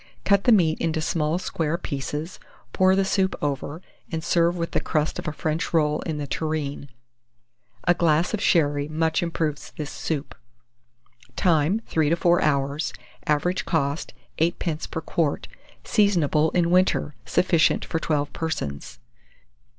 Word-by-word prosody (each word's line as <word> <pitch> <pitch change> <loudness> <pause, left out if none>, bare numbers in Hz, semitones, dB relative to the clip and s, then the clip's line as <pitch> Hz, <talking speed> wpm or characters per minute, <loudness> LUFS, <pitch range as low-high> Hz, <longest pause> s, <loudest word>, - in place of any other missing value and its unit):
Cut 200 -1 +3
the 245 - +6
meat 170 -8 +3
into 160 -1 0
small 155 0 0
square 165 -3 -2
pieces, 150 +1 -5 0.3
pour 185 0 +4
the 195 0 +2
soup 190 -1 +1
over, 145 +3 -3 0.3
and 160 -1 -3
serve 170 0 +2
with 170 -1 -3
the - - +1
crust 155 -1 -1
of - - -6
a - - 0
French 155 +2 -2
roll 150 -2 +2
in 160 -2 -3
the 145 - -3
tureen. 145 -2 -3 0.9
A 175 - +4
glass 170 +1 +2
of 215 - -1
sherry 145 -7 +2
much 160 +2 0
improves 160 -3 -2
this 150 -2 -4
soup. 150 -2 -3 1.0
Time. 175 +4 +2
3 155 -2 +1
to 165 - +3
4 175 0 +3
hours. 140 0 0 0.3
Average 155 +5 +1
cost, 145 -2 -1 0.3
8d. 165 -1 -1
per 160 - -4
quart. 160 -2 -1 0.4
Seasonable 165 -7 +2
in 170 -1 +2
winter. 180 -4 +2
Sufficient 170 -4 +2
for 165 - -2
12 145 -2 -1
persons. 70 - -4
160 Hz, 145 wpm, -24 LUFS, 150-175 Hz, 1.0 s, the